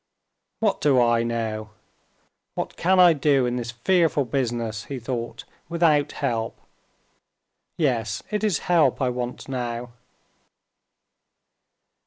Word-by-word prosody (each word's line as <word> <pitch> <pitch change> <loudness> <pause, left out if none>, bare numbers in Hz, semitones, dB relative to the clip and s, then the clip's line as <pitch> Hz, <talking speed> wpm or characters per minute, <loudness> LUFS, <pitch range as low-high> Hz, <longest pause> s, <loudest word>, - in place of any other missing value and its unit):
"What 215 -3 +1
do 140 -3 +4
I 120 -1 +3
know? 110 -2 -3 0.9
what - - -4
can 185 +2 +2
I 175 -2 +8
do 140 -3 +2
in 120 0 -1
this 120 -1 -4
fearful 150 +4 +2
business," 115 -4 -2
he 140 - -5
thought, 120 -1 -5 0.3
"without 155 -4 +2
help? 115 -5 -2 1.2
Yes, 115 - 0
it 210 0 -1
is 210 -6 +2
help 170 -2 +3
I 130 -3 +1
want 125 0 -4
now." 120 -2 -4
125 Hz, 115 wpm, -24 LUFS, 115-150 Hz, 1.2 s, I